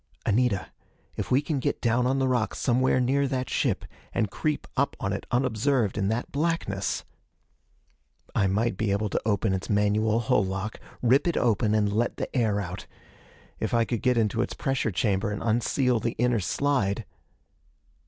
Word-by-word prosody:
"Anita, 110 -3 +1 0.4
if - - -4
we 135 +3 +3
can 145 -2 -1
get - - -1
down 120 +1 +2
on 135 +1 +1
the 135 -1 +1
rocks 125 -4 0
somewhere 130 +1 +2
near 135 +3 +2
the 130 -1 -1
ship, - - -1 0.3
and 105 -3 0
creep 155 -1 -1
up 140 0 0
on 95 - -1
it 100 - -5
unobserved 120 -2 +1
in 100 -2 0
that 115 +4 -2
blackness...." 145 -11 -1 1.3
I 95 - +2
might 105 +1 0
be 110 0 0
able 105 +1 0
to - - 0
open 100 -1 +1
its 95 0 -3
manual 105 +2 +2
hull 120 -2 +2
lock, 100 +3 -4 0.2
rip 130 +7 +4
it 170 - +1
open 110 -2 +2
and 105 -1 +1
let 115 +3 0
the - - -5
air 110 -5 +2
out. 95 -1 -6 0.7
If - - -1
I 115 -1 +3
could 115 -1 -2
get 125 -1 +2
into 115 0 +1
its - - -3
pressure 135 -4 0
chamber 100 +1 0
and 105 +1 -4
unseal 120 +2 +1
the 115 +1 -2
inner 120 -1 +2
slide.... 105 0 0
115 Hz, 175 wpm, -27 LUFS, 105-125 Hz, 1.3 s, rip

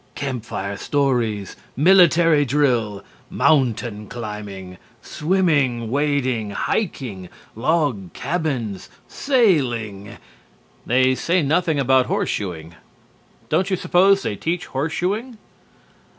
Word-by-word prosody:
Campfire 115 -7 -4
stories, 120 -9 -1 0.2
military 165 -2 +5
drill, 120 -7 0 0.3
mountain 120 -7 +1
climbing, 105 -5 -7 0.2
swimming, 150 - 0
wading, 135 -6 0
hiking, 100 - -3 0.3
log 125 - 0
cabins, 135 - -3 0.2
sailing 125 - 0 0.3
' - - -34
they 130 +2 +3
say 170 +6 0
nothing 160 +1 +1
about 130 -1 +3
horseshoeing. 85 -4 -3 0.7
Don't 190 +1 +1
you 190 - +1
suppose 195 +2 +3
they 105 - -2
teach 170 - -3
horseshoeing?" 185 - -3
130 Hz, 90 wpm, -21 LUFS, 105-165 Hz, 0.7 s, military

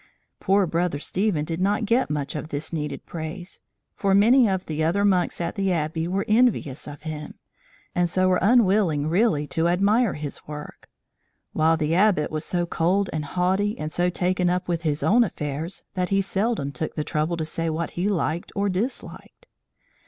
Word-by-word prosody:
Poor 195 0 +3
Brother 170 -2 -1
Stephen 180 0 -1
did 165 +2 -4
not 205 +4 +1
get 235 +4 +2
much 145 -1 -3
of 150 +1 -4
this 150 +3 -4
needed 150 -2 -4
praise, 170 +3 -7 0.3
for 195 -1 +2
many 230 +3 +5
of 190 -1 -1
the 155 0 -2
other 190 +6 +2
monks 185 -3 +1
at 170 - -2
the 195 -1 0
Abbey 160 0 -1
were 195 +2 -1
envious 215 - +2
of 145 0 -9
him, 155 -1 -6 0.6
and 175 -1 +1
so 185 +2 +2
were 185 -1 +3
unwilling 195 -8 +3
really 170 -3 +2
to 160 +3 0
admire 200 +6 +2
his 150 -2 -5
work; 150 0 -9 0.6
while 160 +1 +3
the 155 0 0
Abbot 185 -4 +3
was 155 0 -3
so 175 -1 -1
cold 180 +4 0
and 155 -1 -2
haughty 190 +6 0
and 155 0 -4
so 175 +2 +1
taken 180 0 0
up 180 +1 -1
with 170 -2 -1
his 155 -2 -1
own 240 +3 +5
affairs, 155 -3 -4
that 180 -1 -1
he 195 - +2
seldom 195 -5 -1
took 155 +2 -4
the 150 - -1
trouble 155 +3 -1
to 160 - -2
say 165 +1 -2
what 160 +1 -2
he 185 +4 -1
liked 170 -3 -1
or 200 0 +1
disliked. 230 - -5
175 Hz, 185 wpm, -24 LUFS, 155-195 Hz, 0.6 s, many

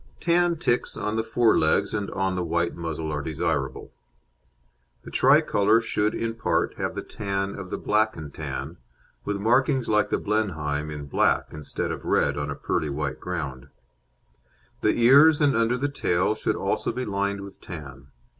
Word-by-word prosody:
Tan 175 0 +2
ticks 125 -7 0
on 105 +1 -2
the 110 - +1
fore 115 0 +3
legs 100 +6 +2
and 105 -2 -2
on 95 -1 -1
the 90 - -1
white 85 +1 0
muzzle 80 -2 -4
are 75 - -2
desirable. 80 +1 -2 1.1
The - - -10
Tricolour 105 +3 +4
should 110 -2 0
in 115 0 -2
part 115 - 0
have - - -3
the - - -4
tan 100 -1 -3
of 95 -2 -8
the - - -3
Black 110 -1 +1
and 75 -3 -8
Tan, - - -5 0.5
with 105 - -1
markings 125 +4 +2
like 105 -1 +2
the - - +1
Blenheim 80 -9 -1
in 75 -1 -6
black 70 - +1
instead 75 -1 -4
of - - -6
red 70 - +2
on 75 0 -3
a 70 - -3
pearly 75 +1 -2
white 70 +2 -3
ground. 65 -2 -5 1.1
The 105 - +3
ears 145 +6 +7
and 145 -4 +3
under 115 +2 +2
the 140 +3 0
tail 95 -8 0
should 110 - -1
also - - -1
be 130 - -4
lined 100 0 -1
with 100 -1 -11
tan. 75 -7 -9
100 Hz, 175 wpm, -25 LUFS, 80-115 Hz, 1.1 s, ears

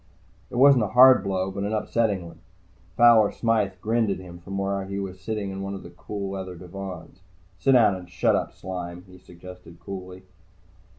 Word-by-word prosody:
It - - -9
wasn't 135 -1 +6
a - - 0
hard 130 -5 +8
blow, 95 -1 -2
but 100 +1 -4
an 105 +2 -2
upsetting 105 -3 0
one. 85 0 -13 0.6
Fowler 115 -3 +6
Smythe 110 -4 0
grinned 115 0 +1
at 100 - -1
him 90 -2 -11
from 95 +3 -7
where 100 0 -1
he 100 +1 -6
was 95 -2 -6
sitting 105 -1 -4
in 95 0 -6
one 100 0 -4
of 95 - -9
the - - -12 0.2
leather 95 -3 -4
divans. 90 0 -9 0.4
"Sit 135 - +3
down 115 -5 +5
and 90 -1 -10
shut 90 - +1
up, - - -2
Sime," 90 -1 -7
he 90 -1 -16
suggested 90 -1 -13
coolly. 95 -1 -9
95 Hz, 185 wpm, -25 LUFS, 90-105 Hz, 0.6 s, hard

